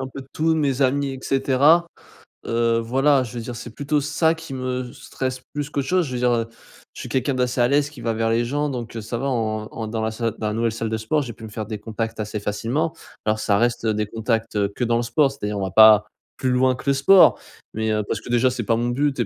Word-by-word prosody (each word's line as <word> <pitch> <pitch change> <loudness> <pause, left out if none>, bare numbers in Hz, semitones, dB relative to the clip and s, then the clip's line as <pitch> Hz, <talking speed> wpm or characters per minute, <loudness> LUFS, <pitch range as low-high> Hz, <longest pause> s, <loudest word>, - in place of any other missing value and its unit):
un 130 - -3
peu 135 +1 -8
de 135 - -13
tout, 160 +1 +1
mes 140 -4 +1
amis 140 +2 +1
et 130 - -8
cetera. 140 +5 +3 0.6
Heu, 115 0 +1
voilà 135 +4 +2
je 115 - -8
veux 120 - -4
dire 120 0 -6
c'est 120 - -8
plutôt 145 +1 0
ça 150 +3 +1
qui 160 -3 -9
me 130 -1 -3
stresse 130 -1 -5
plus 145 0 -3
qu'autre 140 -2 -2
chose. 180 -2 +2
Je 130 - -7
veux 125 - -2
dire, 125 0 +2
heu, 115 -1 0 0.5
je - - -11
suis - - -7
quelqu'un 130 +1 0
d'assez 125 0 -1
à 120 - +4
l'aise, 145 +1 +2
qui 145 -4 -12
va 115 -1 -1
vers 115 0 0
les 115 +1 +1
gens 145 +4 -1
donc, 120 -4 -6
heu, 115 - -4
ça 110 +3 -4
va 135 - -2
en 110 -4 -1
en 110 -1 -5
dans 110 0 -3
la 110 - -1
salle 115 -1 -2
dans 110 - -2
la 105 - -2
nouvelle 115 +1 0
salle 115 0 -3
de 110 - -1
sport, 125 +7 0
j'ai 120 - -7
pu 115 +1 -15
me 110 - -7
faire 110 +1 -5
des 105 0 -6
contacts 115 +1 -4
assez 105 0 -3
facilement. 120 +10 -2 0.3
Alors 110 0 +1
ça 100 -2 +2
reste 120 0 0
des 105 -1 0
contacts, 115 +1 -2
heu, 100 -1 +1
que - - -2
dans 115 -1 +2
le - - 0
sport. 135 +3 +2
C'est-à-dire 105 -6 -4
on 100 - -2
va 95 - -3
pas 110 0 +7 0.3
plus 130 - 0
loin 130 +1 +3
que - - -11
le 140 - +4
sport 160 +8 +6 0.3
mais, 110 0 -1
heu, 105 0 0
parce 110 - -2
que - - -11
déjà 120 +1 +3
c'est 125 -1 -3
pas 115 +2 +1
mon 120 +1 -1
but 135 +2 0
et 120 - +2
120 Hz, 275 wpm, -22 LUFS, 110-135 Hz, 0.6 s, pas